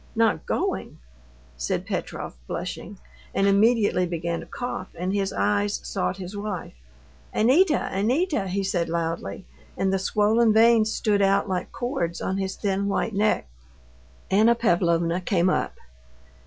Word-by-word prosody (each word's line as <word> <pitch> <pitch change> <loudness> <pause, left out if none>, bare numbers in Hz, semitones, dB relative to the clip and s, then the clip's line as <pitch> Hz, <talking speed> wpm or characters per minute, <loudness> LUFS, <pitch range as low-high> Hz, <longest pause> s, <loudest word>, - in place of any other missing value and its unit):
"Not 225 -1 +1
going!" - - -2 0.6
said 65 - -2
Petrov, - - -4
blushing, - - -5 0.4
and 195 - +2
immediately 200 -2 +3
beginning 170 0 -2
to - - -8
cough, 245 -6 -5
and 180 +3 -2
his 195 -1 0
eyes 205 0 0
sought 190 -1 -2
his 190 +1 -7
wife. 205 -3 -5 0.6
"Anita! 300 - +4
Anita!" 245 - +1
he 195 +2 -1
said 180 -4 -1
loudly, 165 +2 -3 0.3
and 190 0 +1
the 195 - +1
swollen 215 +3 +3
veins 225 0 +5
stood 205 -2 +1
out 195 +1 +3
like 185 -2 -3
cords 210 - -2
on 190 +1 -2
his 190 0 -2
thin 200 -1 -1
white 205 +2 -1
neck. 205 - +1 0.8
Anna 220 +4 +5
Pavlovna 175 -5 +1
came 180 -1 +2
up. - - -1
200 Hz, 140 wpm, -25 LUFS, 180-220 Hz, 0.8 s, veins